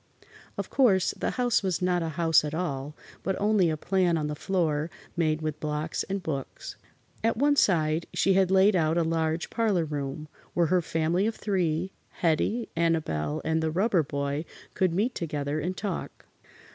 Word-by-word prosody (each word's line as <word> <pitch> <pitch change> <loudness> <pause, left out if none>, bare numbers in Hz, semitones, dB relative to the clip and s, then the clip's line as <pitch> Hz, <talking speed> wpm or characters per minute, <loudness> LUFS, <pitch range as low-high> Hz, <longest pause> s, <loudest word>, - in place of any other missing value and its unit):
Of - - -4
course, 200 -9 +4
the - - -2
house 245 -2 +2
was 185 -5 -1
not 180 -1 +1
a 165 - -2
house 165 -3 +4
at 150 0 -3
all, 150 -4 -3 0.3
but 190 - -2
only 205 -4 +3
a 155 - -1
plan 180 0 +1
on 155 - -1
the 150 0 -3
floor 160 -3 0 0.3
made 155 -2 0
with 155 -1 -3
blocks 150 +1 -2
and 195 -1 -3
books. 140 -5 -5 0.5
At 225 0 +1
one 285 +3 +3
side 160 - +2
she 195 - +2
had 190 -1 +3
laid 190 +2 +5
out 160 -1 +2
a 170 - +3
large 160 0 -1
parlor 210 -8 +1
room, 145 0 -4 0.3
where 175 - +3
her 180 - +4
family 165 +5 0
of 225 - -2
three 180 -3 -1 0.3
Hettie, 190 +8 +1
Annabelle 155 - 0
and 160 0 +1
the 160 - 0
Rubber 190 +2 +2
Boy 140 0 -2 0.3
could 185 -2 +1
meet 210 +9 0
together 150 -2 -3
and 180 +4 -3
talk. 195 -4 -5
165 Hz, 175 wpm, -27 LUFS, 155-190 Hz, 0.5 s, laid